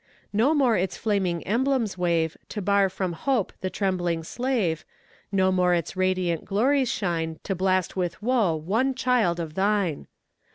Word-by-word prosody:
No 245 +10 +3
more 260 -6 +3
its 185 0 -1
flaming 190 -6 0
emblems 240 -1 +1
wave 170 -3 0
To 215 - -4
bar 200 0 +3
from 185 -1 -3
hope 245 +3 -1
the 185 - -1
trembling 175 -4 -1
slave; 220 -6 -1 0.5
No 190 -1 +3
more 180 -1 +3
its 170 +2 -3
radiant 185 -3 0
glories 255 +6 +2
shine 165 -8 -2
To 195 - -2
blast 185 0 0
with 180 -2 -2
woe 220 -7 +2
one 220 - 0
child 235 -9 +1
of 160 -2 -4
Thine! 195 -4 0
190 Hz, 155 wpm, -25 LUFS, 175-225 Hz, 0.5 s, No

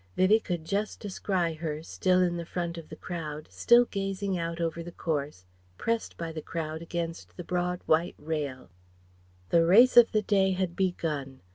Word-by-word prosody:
Vivie 205 +4 +5
could 175 -6 -4
just 205 +4 -2
descry 185 -4 -1
her, 155 -1 -4
still 185 +2 +2
in 175 -1 0
the 170 - -3
front 170 0 -4
of 165 -2 -9
the - - -8
crowd, 155 -4 -6
still 240 +1 +5
gazing 195 -2 -2
out 170 -1 -3
over 170 0 -2
the 175 +1 -8
course, 145 - -3 0.3
pressed 230 0 -2
by 165 -1 -4
the 160 -1 -6
crowd 160 0 -4
against 170 0 -5
the 175 - -5
broad 180 +1 -1
white 165 +3 +2
rail. 145 - -4 0.8
The 170 - +5
race 230 +9 +6
of 240 -1 +8
the 215 -1 +1
day 190 -2 +3
had 185 -2 -2
begun. 150 -8 -2
170 Hz, 175 wpm, -28 LUFS, 160-190 Hz, 0.8 s, of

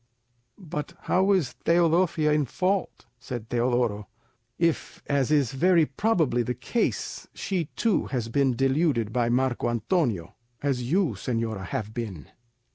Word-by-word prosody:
"But 170 -3 -6
how 190 +2 +2
is 170 -11 +2
Teodosia 170 -2 +3
in 150 -1 +2
fault," 185 +7 -1
said 120 -2 -7
Teodoro, 120 -4 0 0.5
"if, 165 -2 -1
as 140 -2 +1
is 145 -5 +3
very 170 +4 +4
probably 160 - +1
the 125 +1 -2
case, 225 - -2
she 185 -4 -2
too 225 -5 +1
has 120 -4 -2
been 130 +1 +1
deluded 135 -3 +1
by 120 -2 +1
Marco 125 -1 +1
Antonio, 115 - 0 0.3
as 125 -4 -1
you, 185 -2 +3
señora, 110 -2 -3
have 105 +2 -4
been?" 100 - -6
135 Hz, 130 wpm, -26 LUFS, 120-170 Hz, 0.5 s, very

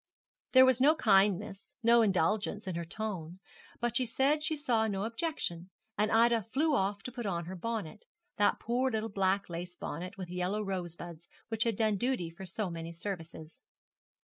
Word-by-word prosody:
There 260 0 +9
was 260 -1 +3
no 300 +4 +6
kindness, 195 - +2
no 235 +1 +6
indulgence 205 +2 +1
in 185 - -3
her 170 0 -3
tone, 180 -2 -5 0.4
but 240 -1 -1
she 255 0 +2
said 275 +6 +2
she 310 +1 0
saw 240 -7 +1
no 195 -2 -2
objection, 225 - -3 0.3
and 210 +1 +1
Ida 230 0 +4
flew 285 - 0
off 200 -4 0
to 250 - -5
put 240 -3 -5
on 170 -3 -2
her 185 +2 -6
bonnet, 220 - -4 0.3
that 205 - +3
poor 250 +3 0
little 220 -2 -2
black 195 0 +1
lace 175 +1 -6
bonnet 180 +3 -6
with 180 -2 -6
yellow 180 +4 -1
rosebuds 175 -3 -5 0.2
which 225 0 +1
had 230 -2 +1
done 215 -1 +1
duty 240 -8 -1
for 190 +3 -9
so 190 +1 -3
many 165 0 -6
services. 165 -3 -7
205 Hz, 175 wpm, -31 LUFS, 180-235 Hz, 0.4 s, There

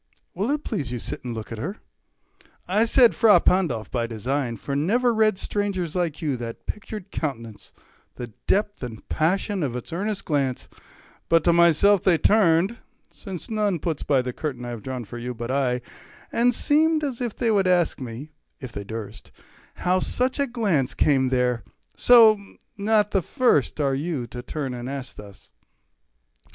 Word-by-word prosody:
Will't 275 - -1
please 145 - -3
you 125 - -2
sit - - -6
and 120 -2 -5
look 110 0 -7
at 115 - -5
her? 185 - -4 0.9
I 210 +5 +3
said 240 0 +5
"Fra 220 -3 +6
Pandolf" 150 - +1
by 120 -2 -1
design, 120 +2 -2
for 140 +6 -4
never 235 - +2
read 215 -3 +3
Strangers 190 -5 -2
like 170 -3 -2
you 145 -4 0
that 115 -1 -7
pictured 210 -2 -6
countenance, 115 -9 -5 0.4
The 120 -3 -8
depth 205 +1 +1
and 115 -4 -8
passion 190 +5 0
of 130 -6 -2
its 125 +6 -6
earnest 200 +3 -2
glance, 135 -5 -1 0.6
But 165 0 +4
to 170 - +4
myself 170 +4 +5
they 180 -4 +4
turned 195 +2 +3 0.3
(since 190 -5 -8
none 210 -4 0
puts 160 -1 -3
by 135 -3 +2
the 125 0 -4
curtain 130 -5 -5
I - - -5
have 120 -2 -6
drawn 130 -1 -5
for 120 +4 -8
you, 125 +1 -5
but 120 +2 -4
I) 130 -2 0 0.5
10 - - -1
And 245 0 +4
seemed 310 +1 +2
as 270 -5 -3
they 235 -1 -1
would 195 -3 +2
ask 175 -2 +2
me, 130 +5 -7 0.3
if 130 -3 -8
they 100 - -6
durst, 110 0 -8 0.4
How 180 +1 +1
such 255 +8 -1
a 280 - +2
glance 190 - 0
came 135 -3 +2
there; 125 -3 0 0.3
so, 225 -4 +7 0.4
not 210 0 +2
the 195 - +2
first 235 - +1
Are 140 -2 +1
you 145 -2 -2
to 125 - -6
turn 135 0 -4
and 120 +1 -6
ask 135 -2 -6
thus. 100 -2 -13
160 Hz, 175 wpm, -24 LUFS, 125-205 Hz, 0.9 s, so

